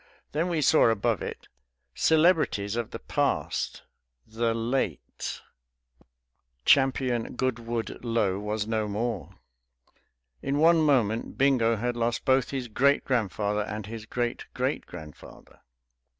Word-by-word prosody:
Then 165 +4 0
we 165 -3 0
saw 155 -4 +5
above 115 -2 0
it, - - -6 0.5
"Celebrities 155 - +3
of 120 -2 -2
the - - -6
Past. - - -1 0.4
The 115 +1 -1
Late 115 - -3 0.6
" - - -38
Champion 130 -4 +2
Goodwood 120 -3 -3
Lo 110 -5 0
was 105 0 -2
no 110 -1 -1
more! 105 0 -3 1.1
In 140 +1 -1
one 165 +2 +5
moment 120 -7 +1
Bingo 125 -4 +3
had 120 +2 -2
lost 120 0 -1
both 130 -1 +3
his 130 -3 -3
great 140 +6 +2
grandfather 105 -4 0
and 105 0 -5
his 110 0 -8
great 120 0 -2
great - - -1
grandfather! 75 -1 -12
115 Hz, 120 wpm, -27 LUFS, 105-130 Hz, 1.1 s, saw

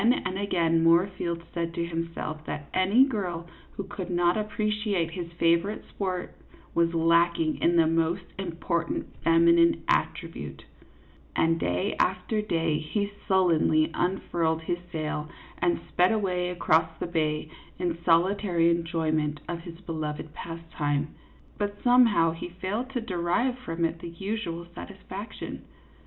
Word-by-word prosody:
Again 235 +3 +4
and 185 +1 -2
again 165 -5 +2
Moorfield 170 0 +2
said 170 -1 -2
to 170 -1 -1
himself 165 -2 -4
that 145 -1 -5
any 195 +7 +5
girl 185 -10 -3 0.3
who 200 - -4
could 190 -2 -6
not 175 0 +3
appreciate 210 -4 -1
his 170 -1 -5
favorite 170 +5 +1
sport 185 -3 -3 0.4
was 170 0 +2
lacking 165 -1 +3
in 170 - +3
the 165 -1 +5
most 165 +3 +1 0.2
important 170 -2 -2 0.2
feminine 170 0 +5
attribute; - - -2 0.7
and 165 0 +2
day 90 - 0
after 190 +4 +1
day 165 -6 0
he 200 +6 -2 0.2
sullenly 165 -4 +3
unfurled 165 -3 0
his 175 +2 -1
sail 155 -2 -3 0.3
and 175 -1 +2
sped 180 +3 +4
away 180 -5 0
across 165 -2 +2
the - - -3
bay 155 -3 -1 0.3
in 175 -2 -1
solitary 175 0 +3
enjoyment 160 -3 0
of 170 -1 -3
his 170 -1 -10
beloved 155 -3 -4
pastime. 155 -3 -3 0.5
But 205 -1 -1
somehow 235 -9 +5
he 165 +2 -6
failed 190 +8 -3
to 245 - -1
derive 205 +5 0
from 165 -8 -2
it 165 0 -2
the 170 - -7
usual 170 -1 -4
satisfaction. 85 - -7
170 Hz, 135 wpm, -27 LUFS, 165-190 Hz, 0.7 s, any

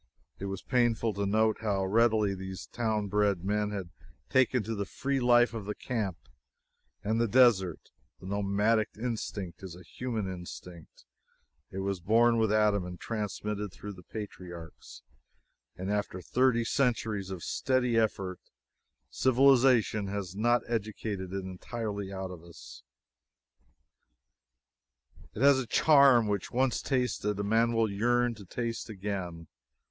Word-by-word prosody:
It 100 - -5
was 95 -1 -5
painful 120 -3 +1
to 100 0 -2
note 110 +2 +2
how 100 -3 0
readily 110 0 +3
these 95 -2 -7
town 110 -3 -1
bred 100 -3 +1
men 105 +1 0
had 95 -5 -5 0.4
taken 130 -2 +3
to 115 +3 -4
the 100 -2 -2
free 140 0 -2
life 120 -1 +4
of 110 -3 -5
the 105 0 -4
camp 105 -8 -3 0.9
and 110 +3 0
the 115 - +2
desert 105 -8 +3 0.3
The - - -13
nomadic 105 +3 +1
instinct 105 -7 -4
is 95 -3 -8
a 90 - -13
human 115 +2 -4
instinct; 90 -2 -9 0.6
it 95 - -5
was 100 -1 -2
born 115 +5 +3
with 110 -2 +2
Adam 105 -2 +3
and 90 -1 -8
transmitted 105 -2 -4
through 105 +2 -8
the 90 - -13
patriarchs, 90 -4 -9 0.7
and 95 +2 -3
after 105 -3 -2
thirty 120 +4 +2
centuries 110 -6 0
of 95 -3 -6
steady 130 -3 0
effort, 100 -5 0 0.7
civilization 125 -5 +4
has 95 -2 -4
not 120 +3 +2
educated 105 -4 -3
it 95 0 -3
entirely 100 +1 -5
out 95 -1 -5
of 85 -2 -10
us 85 -1 -13 2.4
yet. 115 - -6
It - - +6
has 140 -1 +6
a 130 - -4
charm 140 -5 +5
which, 100 -3 -2
once 130 -1 +1
tasted, 125 -6 -1
a - - -1
man 115 +3 +2
will 115 -1 +2
yearn 120 +4 +1
to 105 -3 -12
taste 115 +4 -4
again. 95 -5 -5
105 Hz, 140 wpm, -30 LUFS, 95-115 Hz, 2.4 s, It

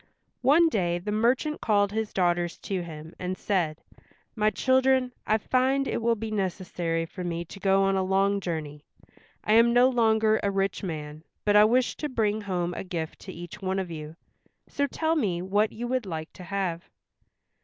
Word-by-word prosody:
One 300 +7 +5
day 175 - 0
the 195 +4 -4
merchant 245 +8 +1
called 205 -2 +2
his 220 0 -2
daughters 175 -2 0
to 190 -2 -2
him 160 -1 -9
and 185 0 -3
said, 170 -6 -1 0.5
"My 215 -1 +3
children, 260 +1 +2
I 215 - +3
find 260 +4 +1
it - - -2
will 230 0 +2
be 220 0 -5
necessary 180 -4 -2
for 180 +2 -8
me 170 -1 -3
to 195 - -11
go 195 0 +3
on 195 0 +2
a 190 - +1
long 195 +1 +2
journey. 155 -5 -5 0.6
I 215 - +2
am 230 +1 +6
no 245 +1 +6
longer 220 -3 +3
a 200 - +1
rich 195 -1 -1
man, 155 -4 -6 0.2
but 205 0 +3
I 210 0 +8
wish 245 +3 +2
to 300 - -3
bring 220 -4 0
home 180 -3 -2
a - - -5
gift 170 -4 -5
to 190 - -9
each 175 +1 -9
one 190 0 -1
of 185 -3 -3
you, 155 0 -7 0.5
so 285 0 -1
tell 320 +3 0
me 195 - 0
what 205 +3 +1
you 240 +2 -5
would 250 -4 -1
like 160 -2 -5
to 180 - -11
have." 180 -2 -3
195 Hz, 190 wpm, -27 LUFS, 175-225 Hz, 0.6 s, I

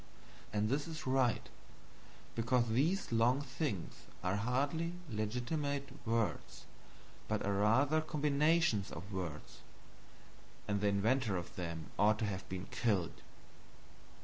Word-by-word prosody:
And 105 +1 +1
it 145 +3 0
is 160 -1 -6
right, 130 -3 +2 0.9
because 120 +1 +2
these 150 - +1
long 115 +3 +4
things 130 - -3 0.3
are 90 +1 +1
hardly 140 +9 0 0.2
legitimate 130 +6 -1 0.2
words, 115 -1 -1 0.6
but - - -1
are 100 - +1
rather 130 +10 +4
combinations 150 - +2
of 90 +5 -7
words, 85 -6 -5 1.1
and 100 -1 0
the 105 - +3
inventor 105 +1 +2
of 85 +1 -6
them 85 -3 -5
ought 105 +1 +5
to 110 - -1
have 95 -2 -4
been 95 0 -4
killed. 100 -8 0
115 Hz, 120 wpm, -35 LUFS, 100-140 Hz, 1.1 s, ought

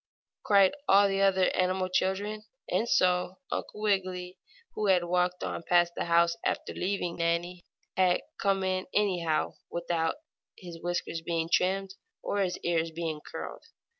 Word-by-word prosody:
cried 200 -2 +5 0.2
all 200 +1 +7
the 195 0 0
other 190 -2 +3
animal 185 0 +1
children. 200 +3 -1 0.2
And 235 - 0
so 180 0 +2
Uncle 210 - -4
Wiggily, 185 -3 -1 0.3
who 215 - -1
had 185 -2 +4
walked 180 +1 0
on - - -3
past 175 0 +3
the - - -2
house 170 0 +3
after - - -2
leaving 180 -2 -2
Nannie, 170 +1 -1 0.3
had 185 -1 +4
to - - -15 0.2
come 195 -1 +1
in 185 0 -1
anyhow, 175 -6 +1
without 170 -1 -1 0.4
his 170 -2 -10
whiskers 175 -1 -2
being 165 0 -2
trimmed, 190 +1 +1 0.3
or 205 - -1
his 185 -2 -1
ears 165 -1 0 0.4
curled. - - -7
180 Hz, 145 wpm, -29 LUFS, 175-195 Hz, 0.4 s, all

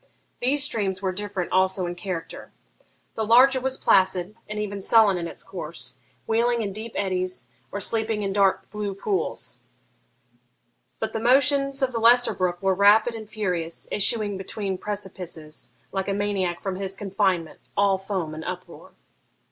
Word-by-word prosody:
These 275 +3 +2
streams 200 -9 0
were 190 - +1
different 200 -1 -4
also 190 0 +2
in 175 - -3
character. 175 -2 -6 0.6
The 220 - -2
larger 255 +4 +6
was 265 0 -1
placid, 190 +1 +2
and 210 - -4
even 205 -1 -3
sullen 215 -1 +5
in 170 -1 -3
its - - -8
course, 130 -8 -8 0.3
wheeling 235 +1 +1
in 200 -2 -3
deep 220 +2 -6
eddies, 185 -6 -2 0.3
or 200 - -3
sleeping 220 0 0
in 195 -1 -1
dark 195 -1 +2
blue 205 -1 -3
pools; 385 - -3 1.4
but - - -3
the 225 - -1
motions 275 +3 +3
of 260 - +2
the 230 - -1
lesser 240 +2 +5
brook 180 0 -2
were 190 0 +3
rapid 205 +4 +5
and 220 -2 -8
furious, 180 -7 -2
issuing 210 0 +2
from 195 - -4
between 195 -1 -4
precipices, 180 -6 -4 0.2
like 195 -1 -2
a 200 - 0
maniac 195 -4 -1
from 190 -2 -2
his 195 0 -2
confinement, 190 -4 -1 0.2
all 200 -1 +3
foam 190 -5 -3
and 155 +1 -6
uproar. 180 +1 -8
200 Hz, 160 wpm, -25 LUFS, 185-220 Hz, 1.4 s, larger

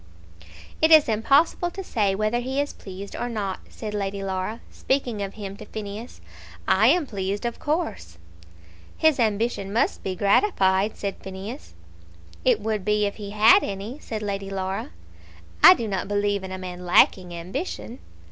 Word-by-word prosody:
"It 315 - +5
is 315 -2 +7
impossible 275 +10 +2
to 385 +2 -7
say 205 - 0
whether 215 +4 0
he 260 +3 -2
is 285 0 -1
pleased 195 +1 -9
or 245 - -3
not," 200 -5 -3
said 215 -2 -7
Lady 200 -1 -3
Laura, 190 +4 -3
speaking 250 -6 -1
of 200 0 -5
him 200 -2 -6
to - - -10
Phineas. 215 - -7 0.5
"I 210 +4 +5
am 325 +4 +4
pleased, 200 -2 -3
of 235 - -3
course." 295 - -3 0.8
"His 315 -4 +3
ambition 215 -2 0
must 225 - 0
be 185 - -3
gratified," 200 - +2
said 200 -1 -4
Phineas. 195 - -8 0.7
"It 250 -4 +3
would 215 -2 -2
be, 210 0 +2
if 200 - -3
he 205 -2 -7
had 215 +2 +6
any," 205 +8 -5
said 215 -6 -5
Lady 200 -1 -3
Laura. 190 0 -3 0.7
"I - - +11
do 230 - -4
not 195 -2 -2
believe 205 -1 0
in 190 - -6
a 185 - -4
man 180 -1 -7
lacking 180 0 +4
ambition." 190 - -5
205 Hz, 165 wpm, -24 LUFS, 195-240 Hz, 0.8 s, I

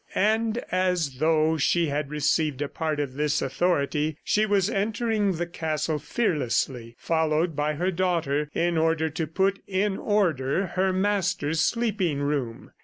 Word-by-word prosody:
And 220 +2 +2
as 180 -7 0
though 160 +1 +2
she 165 +2 +2
had 145 0 -2
received 150 -1 0
a - - -3
part 155 0 -3
of 140 -3 -2
this 150 +1 0
authority, 150 0 0
she 215 +1 +2
was 200 -2 +2
entering 210 0 0
the 175 +1 -2
castle 155 -2 -2
fearlessly, 135 - -1
followed 160 0 0
by 150 +1 0
her 180 +5 0
daughter, 165 -5 0
in 170 -1 +1
order 160 0 +1
to 160 0 -3
put 195 +5 0
in 195 +1 0
order 175 -5 +1
her 190 +1 +1
master's 185 -5 0
sleeping 205 -8 0
room. 140 -5 -3
160 Hz, 145 wpm, -26 LUFS, 150-190 Hz, -, And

